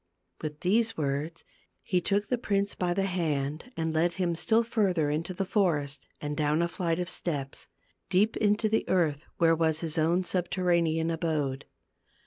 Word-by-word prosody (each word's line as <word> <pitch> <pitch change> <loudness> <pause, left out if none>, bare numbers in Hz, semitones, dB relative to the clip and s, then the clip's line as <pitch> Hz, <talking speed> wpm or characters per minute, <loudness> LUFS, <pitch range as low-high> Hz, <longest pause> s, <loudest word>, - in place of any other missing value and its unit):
With 150 -1 -5
these 225 +5 +2
words 150 +3 -2 0.4
he 180 -2 +1
took 200 +3 +1
the 250 +1 -1
prince 200 -3 0
by 175 -1 -1
the 195 - +1
hand 155 - -2
and 160 -1 -1
led 170 +2 +2
him 180 -2 0
still 225 +7 +2
further 190 -10 +1
into 165 +4 -2
the 195 +2 -2
forest 150 -9 0
and 150 0 -3
down 150 +2 +1
a - - +1
flight 170 0 -1
of 180 - -2
steps, 145 -7 -4 0.4
deep 200 +4 +3
into 210 +1 +2
the 220 +1 0
earth 160 -4 +1
where 165 -1 +4
was 160 -1 +1
his 165 -1 -1
own 170 +4 +2
subterranean 170 -3 +1
abode. 150 -5 -1
170 Hz, 165 wpm, -28 LUFS, 155-190 Hz, 0.4 s, where